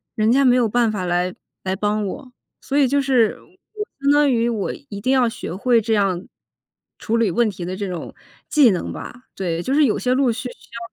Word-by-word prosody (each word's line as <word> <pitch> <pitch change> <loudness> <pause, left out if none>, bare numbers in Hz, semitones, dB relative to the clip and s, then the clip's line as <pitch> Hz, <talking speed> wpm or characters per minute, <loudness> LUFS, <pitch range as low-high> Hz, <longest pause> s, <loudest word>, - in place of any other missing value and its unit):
人 220 +1 +2
家 275 +2 +4
没 250 0 +5
有 240 -3 +3
办 235 0 +2
法 190 -4 -3
来 180 +1 0 0.3
来 190 0 -1
帮 210 +1 -1
我。 250 +6 -7 0.3
所 280 - -2
以 280 -3 +5
就 280 +2 +2
是， 255 -5 +2
我 420 +3 -10 0.2
相 280 +1 +3
当 290 -1 +4
于 235 0 +1
我 215 -4 -2 0.2
一 200 -1 -6
定 255 +5 0
要 255 -2 +4
学 185 - -6
会 235 +3 +3
这 225 +1 -1
样 195 -3 0 0.7
处 225 - -1
理 225 -6 +2
问 235 +3 +2
题 180 -3 -7
的 185 +1 -4
这 200 0 -4
种 180 -2 -6 0.4
技 290 -6 +6
能 180 - -3
吧， 250 +1 -9
对。 170 -3 -2
就 265 - -1
是 295 0 +5
有 215 - +1
些 250 - 0
路 260 -2 +2
是 245 - -4
需 250 - -4
要 235 - -11
230 Hz, 245 characters per minute, -21 LUFS, 200-260 Hz, 0.7 s, 技